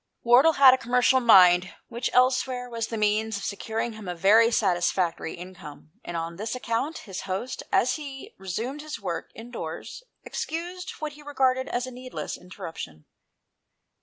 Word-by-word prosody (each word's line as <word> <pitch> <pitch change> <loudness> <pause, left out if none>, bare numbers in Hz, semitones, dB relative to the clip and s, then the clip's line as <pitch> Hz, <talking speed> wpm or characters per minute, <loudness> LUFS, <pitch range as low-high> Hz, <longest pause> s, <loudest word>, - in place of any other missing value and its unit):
Wardle 255 +7 +6
had 275 -3 +8
a 260 - +1
commercial 250 +2 +3
mind, 185 -6 +6
which 235 +1 -3
elsewhere 255 0 +2
was 230 -2 -3
the 225 - -4
means 215 0 +1
of 200 - -7
securing 225 +3 -3
him 215 -3 -10
a 180 - -3
very 215 +6 +5
satisfactory 180 -5 0
income, 175 -4 -11
and 175 - -5
on 165 +1 -4
this 220 +4 -3
account, 250 +6 -2
his 190 -2 -6
host, 200 +7 -3
as 250 +4 +2
he 275 -3 -9
resumed 225 - -4
his 305 -5 -6
work 180 -5 -4
indoors, 225 - -7 0.2
excused 355 +3 -5
what 305 -1 -5
he 295 - -14
regarded 260 -3 +1
as 245 +1 -1
a 255 - -8
needless 255 +1 -6
interruption. 160 - -9
230 Hz, 160 wpm, -26 LUFS, 185-260 Hz, 0.2 s, had